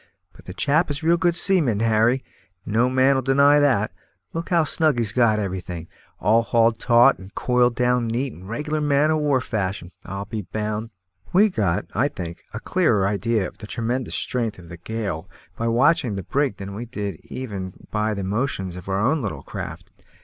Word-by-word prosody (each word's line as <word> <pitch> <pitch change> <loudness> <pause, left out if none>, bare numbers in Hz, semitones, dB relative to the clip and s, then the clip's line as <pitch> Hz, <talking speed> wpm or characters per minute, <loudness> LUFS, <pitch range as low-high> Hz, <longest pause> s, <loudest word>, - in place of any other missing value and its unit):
But - - -17
the 90 - -7
chap 155 +8 +2
is 145 +1 -4
a - - -4
real 170 +1 +5
good 175 -1 +2
seaman, 170 - +3
Harry, 115 +3 +2 0.4
no 115 +4 +2
man'll 130 +1 +3
deny 140 +3 +5
that; 125 -8 +2 0.4
look 165 +1 -4
how 170 -2 +4
snug 155 -2 +1
he's 115 -3 0
got 115 -2 +3
everything; 90 -4 -4
and 80 - -14 0.3
all 110 +4 +4
hauled 115 0 +2
taut 120 +2 +5
and 95 +2 -13
coiled 125 -1 +2
down 125 -1 +1
neat 120 +3 -2
and 95 +4 -12
reg'lar 150 +6 -2
man 150 +1 +3
o' 155 - +2
war 145 -3 +2
fashion 100 -7 -3
I'll 100 +2 -5
be 110 +1 -4
bound." 105 +3 -4 0.4
We 205 +4 +5
got, 95 - 0
I 125 +7 +2
think, 85 - -7
a 105 - -5
clearer 115 - +2
idea 105 0 0
of - - -14
the 105 - -8
tremendous 120 +3 -2
strength 115 -4 -1
of 85 -2 -13
the 85 - -8
gale 100 -2 -4 0.3
by 115 - -2
watching 125 0 +3
the 95 - -4
brig 140 - 0
than 100 0 -7
we 115 +4 -5
did 100 -7 -5
even 100 -8 -7
by 105 0 0
the 100 - -4
motions 95 -3 -2
of 90 +1 -9
our 95 0 0
own 135 +9 +2
little 105 -5 -4
craft. - - -7
115 Hz, 195 wpm, -23 LUFS, 100-135 Hz, 0.4 s, real